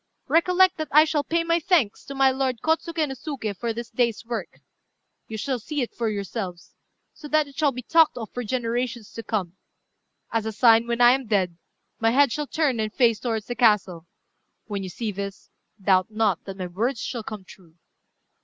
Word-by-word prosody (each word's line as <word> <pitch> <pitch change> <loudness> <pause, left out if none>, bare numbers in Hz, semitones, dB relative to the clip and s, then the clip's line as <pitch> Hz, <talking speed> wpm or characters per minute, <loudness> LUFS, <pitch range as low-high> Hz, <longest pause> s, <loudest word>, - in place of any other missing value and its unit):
Recollect 365 +2 +4
that 310 -1 -3
I 305 +2 +7
shall 300 -2 0
pay 330 +3 0
my 335 0 +2
thanks 310 - +1
to 275 - -7
my 270 0 +4
lord 260 -3 -1
Kôtsuké 320 0 0
no 270 - -5
Suké 255 -6 -5
for 230 +4 -3
this 235 +1 -6
day's 235 -3 0
work. 235 -1 -5 0.7
You 220 - -6
shall 255 +3 -2
see 295 +6 -3
it 240 - -6
for 230 -2 -1
yourselves, 200 -3 -5 0.4
so 300 - -10
that 305 0 +2
it 280 - -15
shall 300 -3 +2
be 250 -1 -7
talked 325 0 +4
of 225 -4 -6
for 245 - -4
generations 240 -1 -2
to 230 - -6
come. 195 -5 -3 0.7
As 225 -1 -1
a - - -2
sign, 230 +1 +5
when 235 0 -1
I 240 0 +8
am 265 -1 0
dead, 190 -5 +1 0.4
my 225 - +3
head 275 +2 +4
shall 295 +2 -2
turn 280 -7 0
and 215 -1 -1
face 230 -3 +3
towards 225 -3 -2
the 245 - -4
castle. 210 -8 +2 0.6
When 205 -3 -4
you 190 - -5
see 220 +4 -4
this, 200 0 -7 0.3
doubt 190 -1 +2
not 215 -5 0
that 195 -1 -7
my 185 - -4
words 220 +8 -2
shall 235 0 -4
come 215 -2 -7
true." 175 -4 -17
235 Hz, 200 wpm, -24 LUFS, 210-275 Hz, 0.7 s, I